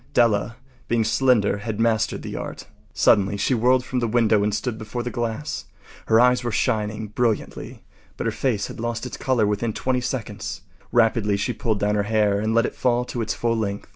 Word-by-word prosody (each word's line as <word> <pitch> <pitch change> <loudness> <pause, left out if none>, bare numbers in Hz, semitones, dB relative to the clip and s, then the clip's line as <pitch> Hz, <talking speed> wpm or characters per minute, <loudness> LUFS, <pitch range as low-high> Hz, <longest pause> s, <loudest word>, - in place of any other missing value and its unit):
Della, 115 -1 +3 0.3
being 115 -1 +2
slender, 115 -4 +2
had 110 +1 -4
mastered 115 -2 +1
the - - -6
art. - - -6 0.3
Suddenly 100 0 +3
she 115 - +1
whirled 125 +2 +3
from 130 - -2
the 120 - 0
window 110 -2 +3
and 105 - +1
stood 110 +2 -3
before 115 +2 -4
the 125 - -4
glass. 120 +5 -3 0.4
Her 110 - +5
eyes 125 0 +4
were 120 - -1
shining 110 -2 -1
brilliantly, 115 0 -2 0.3
but - - -3
her - - +1
face 110 -7 -1
had - - -8
lost 120 +1 -3
its 125 - -6
color 125 -5 +1
within 105 +2 -1
twenty 130 +2 -1
seconds. 105 -5 -4 0.3
Rapidly 110 -3 +3
she 110 +5 -1
pulled 110 -3 -1
down 105 +1 +1
her 105 - +2
hair 105 -2 +2
and 110 +2 0
let 115 +1 +4
it - - -3
fall 125 -1 +1
to 120 - -4
its 110 - -2
full 115 -1 0
length. 100 -3 -3
115 Hz, 200 wpm, -23 LUFS, 105-120 Hz, 0.4 s, Her